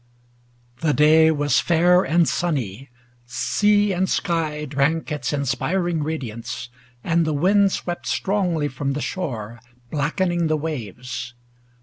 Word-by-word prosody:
The 155 Hz, -3 st, +2 dB
day 160 Hz, +2 st, +6 dB
was 145 Hz, -4 st, +2 dB
fair 175 Hz, +2 st, +4 dB
and 170 Hz, +1 st, +2 dB
sunny; 135 Hz, -, -2 dB, 0.4 s
sea 205 Hz, -, +2 dB
and 185 Hz, +1 st, 0 dB
sky 160 Hz, -5 st, -1 dB
Drank 150 Hz, +4 st, 0 dB
its 150 Hz, -, -2 dB
inspiring 155 Hz, +5 st, -1 dB
radiance, 125 Hz, -6 st, -5 dB, 0.3 s
and 170 Hz, 0 st, +2 dB
the 155 Hz, -1 st, 0 dB
wind 195 Hz, +6 st, +3 dB
Swept 175 Hz, -1 st, -4 dB
strongly 180 Hz, -6 st, 0 dB
from 140 Hz, 0 st, -3 dB
the 145 Hz, -, -3 dB
shore, 120 Hz, -, -4 dB, 0.3 s
blackening 170 Hz, +3 st, 0 dB
the 155 Hz, 0 st, +1 dB
waves. 125 Hz, -, -5 dB
155 Hz, 120 wpm, -22 LUFS, 140-175 Hz, 0.4 s, day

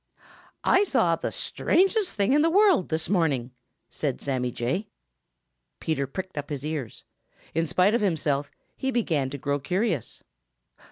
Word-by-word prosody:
"I 380 Hz, -, +5 dB
saw 180 Hz, -, +2 dB
the -, -, -4 dB
strangest 390 Hz, +2 st, +1 dB
thing 205 Hz, +5 st, +2 dB
in 295 Hz, -, +5 dB
the 325 Hz, -, +4 dB
world 380 Hz, -, +4 dB
this 160 Hz, 0 st, -1 dB
morning," 150 Hz, -10 st, +1 dB, 0.4 s
said 140 Hz, -4 st, -3 dB
Sammy 130 Hz, -3 st, -1 dB
Jay. 130 Hz, -, -2 dB, 0.9 s
Peter 140 Hz, -4 st, -1 dB
pricked 185 Hz, +3 st, -5 dB
up 145 Hz, -, -7 dB
his 145 Hz, -1 st, -4 dB
ears. 150 Hz, -7 st, -5 dB, 0.5 s
In 165 Hz, +1 st, 0 dB
spite 185 Hz, +7 st, +3 dB
of 235 Hz, -, +2 dB
himself, 150 Hz, -7 st, 0 dB, 0.3 s
he 265 Hz, -, -2 dB
began 165 Hz, -, 0 dB
to 140 Hz, -, -5 dB
grow 145 Hz, +1 st, -1 dB
curious. 180 Hz, -, -2 dB
165 Hz, 150 wpm, -26 LUFS, 140-215 Hz, 0.9 s, I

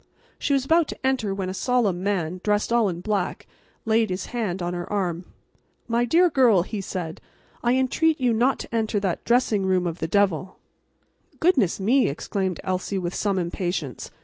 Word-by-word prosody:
She 285 Hz, -, 0 dB
was 270 Hz, -1 st, +1 dB
about 325 Hz, +1 st, +3 dB
to -, -, -7 dB
enter, 260 Hz, -6 st, +1 dB
when 195 Hz, -1 st, -3 dB
a 185 Hz, -, -3 dB
solemn 210 Hz, -5 st, +1 dB
man, 185 Hz, -3 st, -1 dB
dressed 210 Hz, +2 st, +1 dB
all 235 Hz, -4 st, +3 dB
in 175 Hz, -1 st, -5 dB
black, 200 Hz, -2 st, -2 dB, 0.4 s
laid 225 Hz, 0 st, +2 dB
his 185 Hz, +1 st, -3 dB
hand 210 Hz, -7 st, -2 dB
on 175 Hz, 0 st, -2 dB
her 175 Hz, +2 st, -5 dB
arm. 180 Hz, -4 st, -1 dB, 0.6 s
"My 235 Hz, +1 st, +1 dB
dear 340 Hz, +9 st, +4 dB
girl," 250 Hz, -, +4 dB
he 205 Hz, +1 st, -5 dB
said, 175 Hz, -4 st, -5 dB, 0.4 s
"I 240 Hz, +1 st, +2 dB
entreat 300 Hz, +5 st, +2 dB
you 250 Hz, -3 st, +2 dB
not 245 Hz, +4 st, +2 dB
to -, -, -7 dB
enter 220 Hz, -2 st, 0 dB
that 190 Hz, -4 st, -2 dB
dressing 235 Hz, -4 st, +2 dB
room 185 Hz, -1 st, +1 dB
of 170 Hz, 0 st, -3 dB
the 160 Hz, -, -2 dB
devil." 185 Hz, 0 st, +1 dB, 0.8 s
"Goodness 270 Hz, -, +2 dB
me!" 245 Hz, +7 st, +3 dB
exclaimed 185 Hz, +4 st, -3 dB
Elsie, 185 Hz, +1 st, -2 dB
with 175 Hz, -1 st, -3 dB
some 200 Hz, -2 st, 0 dB
impatience. 175 Hz, -4 st, -3 dB
200 Hz, 180 wpm, -24 LUFS, 180-240 Hz, 0.8 s, dear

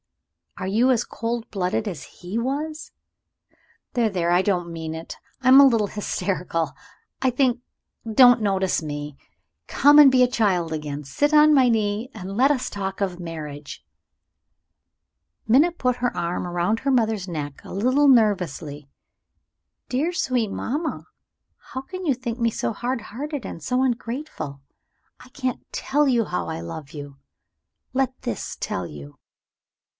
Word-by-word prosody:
Are 185 Hz, -, -4 dB
you 225 Hz, +7 st, +3 dB
as 240 Hz, -2 st, +1 dB
cold 230 Hz, 0 st, -4 dB
blooded 195 Hz, +2 st, -1 dB
as 170 Hz, -8 st, -5 dB
he 180 Hz, +5 st, -7 dB
was? 295 Hz, +6 st, -3 dB, 1.0 s
There! 235 Hz, -3 st, +2 dB
there! 175 Hz, -3 st, 0 dB
I 175 Hz, +1 st, +4 dB
don't 175 Hz, -3 st, -1 dB
mean 160 Hz, -1 st, -5 dB
it; 160 Hz, +1 st, -7 dB, 0.3 s
I 260 Hz, -, -1 dB
am 260 Hz, +1 st, +9 dB
a -, -, +9 dB
little 230 Hz, -6 st, +3 dB
hysterical, 180 Hz, -7 st, -2 dB, 0.5 s
I 260 Hz, -, +3 dB
think 250 Hz, -1 st, +1 dB, 0.5 s
don't 245 Hz, +1 st, +7 dB
notice 190 Hz, -3 st, +1 dB
me. 145 Hz, -2 st, -5 dB, 0.5 s
Come 290 Hz, +1 st, +5 dB
and 285 Hz, -3 st, +9 dB
be 255 Hz, -1 st, +5 dB
a -, -, +5 dB
child 190 Hz, -9 st, +1 dB
again. 150 Hz, -1 st, -4 dB
Sit 290 Hz, -, 0 dB
on 305 Hz, 0 st, +7 dB
my 260 Hz, -3 st, +5 dB
knee, 215 Hz, +1 st, 0 dB
and 195 Hz, -2 st, -7 dB
let 265 Hz, +6 st, +4 dB
us 260 Hz, -3 st, -1 dB
talk 195 Hz, -1 st, -4 dB
of 195 Hz, -2 st, 0 dB
your 175 Hz, -, -13 dB
marriage." 150 Hz, -, -7 dB, 1.6 s
Minna 285 Hz, +10 st, +5 dB
put 250 Hz, -7 st, -1 dB
her 245 Hz, 0 st, -1 dB
arm 175 Hz, +1 st, -2 dB
round 175 Hz, +6 st, 0 dB
her 275 Hz, -, 0 dB
mother's 220 Hz, -6 st, +1 dB
neck 145 Hz, -5 st, -5 dB
a -, -, -9 dB
little 255 Hz, +8 st, +3 dB
nervously. 180 Hz, -, +2 dB, 1.0 s
"Dear, 285 Hz, +7 st, 0 dB
sweet 255 Hz, -, 0 dB
mamma, 300 Hz, +11 st, -3 dB, 0.7 s
how 260 Hz, -, -3 dB
can 370 Hz, +6 st, -7 dB
you 290 Hz, -, +3 dB
think 240 Hz, -1 st, -5 dB
me 235 Hz, -1 st, +2 dB
so 225 Hz, -, -2 dB
hard 245 Hz, +3 st, -3 dB
hearted 275 Hz, +4 st, -6 dB
and 165 Hz, -, -7 dB
so 250 Hz, -, +1 dB
ungrateful? 235 Hz, -, -3 dB, 0.6 s
I 255 Hz, -, -15 dB
can't 255 Hz, -1 st, -4 dB
tell 290 Hz, +2 st, +1 dB
you 240 Hz, -4 st, +2 dB
how 90 Hz, -, -3 dB
I -, -, -4 dB
love 85 Hz, -, -7 dB
you! 145 Hz, -3 st, -9 dB, 0.7 s
Let 260 Hz, -1 st, -1 dB
this 245 Hz, -, -4 dB
tell 90 Hz, -, -3 dB
you." 70 Hz, -1 st, -11 dB
220 Hz, 155 wpm, -23 LUFS, 170-255 Hz, 1.6 s, am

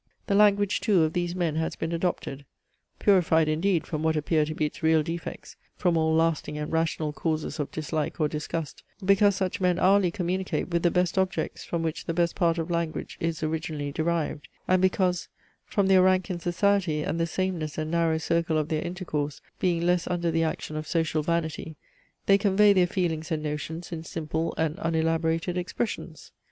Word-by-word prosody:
"The 200 Hz, -, 0 dB
language, 205 Hz, -1 st, +4 dB
too, 190 Hz, -6 st, +4 dB
of 155 Hz, -, 0 dB
these 175 Hz, 0 st, -1 dB
men 170 Hz, -4 st, 0 dB
has 160 Hz, 0 st, -1 dB
been 160 Hz, -, -3 dB
adopted 165 Hz, -5 st, -2 dB, 0.5 s
(purified 165 Hz, -5 st, +4 dB
indeed 165 Hz, +3 st, +1 dB
from 155 Hz, -2 st, -3 dB
what 160 Hz, 0 st, +1 dB
appear 155 Hz, 0 st, +1 dB
to 155 Hz, +1 st, -5 dB
be 155 Hz, -, 0 dB
its 150 Hz, -, -6 dB
real 160 Hz, -1 st, +4 dB
defects, 165 Hz, +2 st, -6 dB, 0.2 s
from 175 Hz, -2 st, +1 dB
all 160 Hz, 0 st, +2 dB
lasting 160 Hz, -2 st, +1 dB
and 150 Hz, 0 st, -4 dB
rational 160 Hz, -2 st, 0 dB
causes 155 Hz, +1 st, -2 dB
of 145 Hz, -, -2 dB
dislike 155 Hz, +1 st, -3 dB
or 155 Hz, -, +3 dB
disgust) 150 Hz, 0 st, -4 dB, 0.2 s
because 200 Hz, +1 st, +5 dB
such 190 Hz, 0 st, -2 dB
men 180 Hz, -1 st, +2 dB
hourly 195 Hz, -1 st, +4 dB
communicate 185 Hz, +1 st, -2 dB
with 170 Hz, -1 st, 0 dB
the 175 Hz, -, +4 dB
best 180 Hz, +1 st, +1 dB
objects 190 Hz, 0 st, -1 dB
from 170 Hz, -1 st, -3 dB
which 160 Hz, -1 st, -3 dB
the 165 Hz, -, -2 dB
best 170 Hz, -1 st, +2 dB
part 170 Hz, -3 st, +2 dB
of 165 Hz, +1 st, -3 dB
language 170 Hz, -2 st, -3 dB
is 165 Hz, -1 st, -2 dB
originally 155 Hz, -2 st, -2 dB
derived; 160 Hz, -1 st, -1 dB, 0.2 s
and 185 Hz, 0 st, +3 dB
because, 185 Hz, -1 st, +1 dB, 0.4 s
from 200 Hz, -3 st, +1 dB
their 190 Hz, -1 st, +6 dB
rank 185 Hz, +1 st, +3 dB
in 175 Hz, -, -3 dB
society 175 Hz, -2 st, +1 dB
and 165 Hz, -, -2 dB
the 165 Hz, -, +1 dB
sameness 170 Hz, -4 st, -2 dB
and 155 Hz, 0 st, -2 dB
narrow 165 Hz, -1 st, +2 dB
circle 165 Hz, 0 st, 0 dB
of 155 Hz, 0 st, -1 dB
their 155 Hz, -1 st, 0 dB
intercourse, 170 Hz, -5 st, -3 dB, 0.2 s
being 170 Hz, -2 st, +1 dB
less 175 Hz, -1 st, +2 dB
under 175 Hz, -2 st, 0 dB
the 165 Hz, 0 st, +1 dB
action 155 Hz, -1 st, -3 dB
of 155 Hz, 0 st, -4 dB
social 160 Hz, -2 st, 0 dB
vanity, 160 Hz, -1 st, -2 dB, 0.5 s
they 195 Hz, 0 st, +5 dB
convey 205 Hz, +1 st, +5 dB
their 180 Hz, -2 st, +4 dB
feelings 165 Hz, -4 st, -2 dB
and 155 Hz, -1 st, -1 dB
notions 155 Hz, +3 st, -4 dB
in 165 Hz, -2 st, -5 dB
simple 160 Hz, 0 st, -3 dB
and 160 Hz, +1 st, 0 dB
unelaborated 165 Hz, 0 st, 0 dB
expressions." 195 Hz, +5 st, -4 dB
165 Hz, 190 wpm, -27 LUFS, 155-180 Hz, 0.5 s, their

